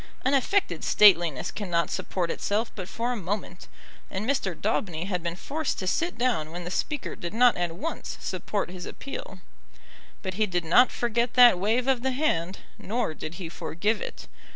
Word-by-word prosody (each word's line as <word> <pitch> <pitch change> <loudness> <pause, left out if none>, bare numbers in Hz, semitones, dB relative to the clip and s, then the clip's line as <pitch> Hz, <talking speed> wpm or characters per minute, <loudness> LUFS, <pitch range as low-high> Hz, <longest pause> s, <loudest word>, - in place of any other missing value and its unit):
An 265 - +3
affected 375 +9 +1
stateliness 175 -9 +5
cannot 175 -5 -1
support 175 -3 -2
itself 215 +3 -1
but 185 -3 -7
for 235 +2 -2
a - - -1
moment; 190 -2 -4 0.4
and 195 +4 -3
Mr. 200 - -1
Daubeny 180 -5 -1
had 180 -2 -2
been 170 0 -3
forced 295 - -3
to 185 - -4
sit 335 - 0
down 240 -11 0
when 175 +1 -6
the 175 - -6
Speaker 295 +9 -2
did 170 +4 -6
not 245 +1 +6
at 175 -2 -2
once 325 - -5
support 205 -4 -3
his 180 -1 -7
appeal. - - -7 0.8
But 190 -1 -3
he 215 +3 +1
did 175 -3 -1
not 245 +10 +6
forget 235 0 -1
that 245 -7 +8
wave 225 +6 +1
of 260 -3 +2
the 265 +1 0
hand, 190 - 0 0.2
nor 225 -4 -2
did 155 +1 -7
he 175 -2 -6
forgive 205 +6 -1
it. - - -7
205 Hz, 180 wpm, -27 LUFS, 175-245 Hz, 0.8 s, that